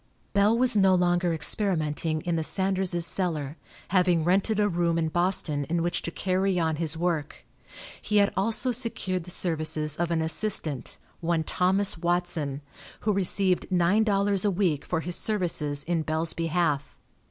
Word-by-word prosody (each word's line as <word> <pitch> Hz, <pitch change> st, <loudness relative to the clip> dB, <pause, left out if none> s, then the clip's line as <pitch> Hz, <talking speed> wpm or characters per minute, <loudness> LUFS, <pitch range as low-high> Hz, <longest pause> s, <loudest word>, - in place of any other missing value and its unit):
Bell 205 Hz, +3 st, +3 dB
was 250 Hz, -2 st, +4 dB
no 195 Hz, -2 st, +4 dB
longer 175 Hz, 0 st, +1 dB
experimenting 160 Hz, -3 st, 0 dB
in 175 Hz, +1 st, -2 dB
the 165 Hz, -, 0 dB
Sanderses' 190 Hz, -1 st, 0 dB
cellar, 160 Hz, -7 st, -2 dB, 0.3 s
having 180 Hz, -3 st, +2 dB
rented 195 Hz, +5 st, +1 dB
a 205 Hz, -, +3 dB
room 170 Hz, -3 st, 0 dB
in 160 Hz, -1 st, 0 dB
Boston 175 Hz, -4 st, 0 dB
in 165 Hz, +3 st, -1 dB
which 175 Hz, -, -1 dB
to -, -, -4 dB
carry 185 Hz, +1 st, -1 dB
on 160 Hz, -2 st, 0 dB
his 160 Hz, 0 st, -1 dB
work. 165 Hz, -3 st, -3 dB, 0.6 s
He 210 Hz, -, 0 dB
had 200 Hz, -1 st, +3 dB
also 225 Hz, +6 st, +1 dB
secured 205 Hz, -7 st, -2 dB
the -, -, -10 dB
services 155 Hz, -4 st, -1 dB
of 170 Hz, 0 st, -1 dB
an 165 Hz, -1 st, 0 dB
assistant, 160 Hz, -, -1 dB, 0.2 s
one 165 Hz, -1 st, 0 dB
Thomas 185 Hz, +2 st, +2 dB
Watson, 170 Hz, -5 st, -2 dB, 0.4 s
who 210 Hz, -, 0 dB
received 190 Hz, -1 st, +2 dB
nine 185 Hz, +4 st, +3 dB
dollars 200 Hz, -2 st, +1 dB
a 205 Hz, -, +2 dB
week 175 Hz, -6 st, 0 dB
for 160 Hz, -2 st, -2 dB
his 175 Hz, +1 st, -1 dB
services 165 Hz, -9 st, -1 dB
in 170 Hz, -1 st, -1 dB
Bell's 160 Hz, +1 st, -2 dB
behalf. 165 Hz, -4 st, -1 dB
175 Hz, 160 wpm, -26 LUFS, 160-195 Hz, 0.6 s, was